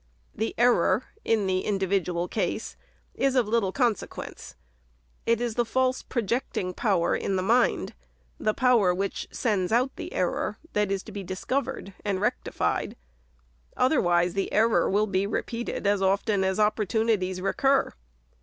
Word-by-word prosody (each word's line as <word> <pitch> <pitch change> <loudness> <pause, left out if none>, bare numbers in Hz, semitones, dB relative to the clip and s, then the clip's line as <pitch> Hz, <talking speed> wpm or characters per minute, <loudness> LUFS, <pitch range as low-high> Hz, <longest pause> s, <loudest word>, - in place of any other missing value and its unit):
The 220 +2 -3
error 235 -3 +3 0.2
in 220 -3 +1
the 185 -1 +1
individual 185 -3 0
case - - -2 0.4
is 270 -1 +1
of 245 -4 +3
little 215 -3 +1
con 240 0 +3
sequence. - - -9 0.7
It 230 -1 +3
is 240 -2 -1
the 240 - +1
false 255 +2 0
projecting 230 -5 -2
power 190 -4 +1
in 195 - -1
the 185 - 0
mind, 235 +5 +2 0.2
— - - -37
the 215 0 0
power 235 -9 +4
which 195 +2 -3
sends 205 -6 -1
out 250 +4 +2
the - - -6
error, 185 +4 -1
— - - -25
that 210 -1 +1
is 195 -1 -1
to 220 - -10
be 200 -1 -5
dis 185 0 -6
covered 260 -7 -2
and 200 -2 -1
rectified; 210 - -1 0.8
otherwise 175 - +3
the 195 -1 -2
error 225 +2 +3
will 205 +2 +2
be 195 -1 0
re 210 - -1
peated 235 -2 -5
as 200 -1 +2
often 195 +1 +2
as 190 +1 0
opportunities 210 -2 +1
recur. 270 +8 +1
210 Hz, 160 wpm, -26 LUFS, 190-235 Hz, 0.8 s, power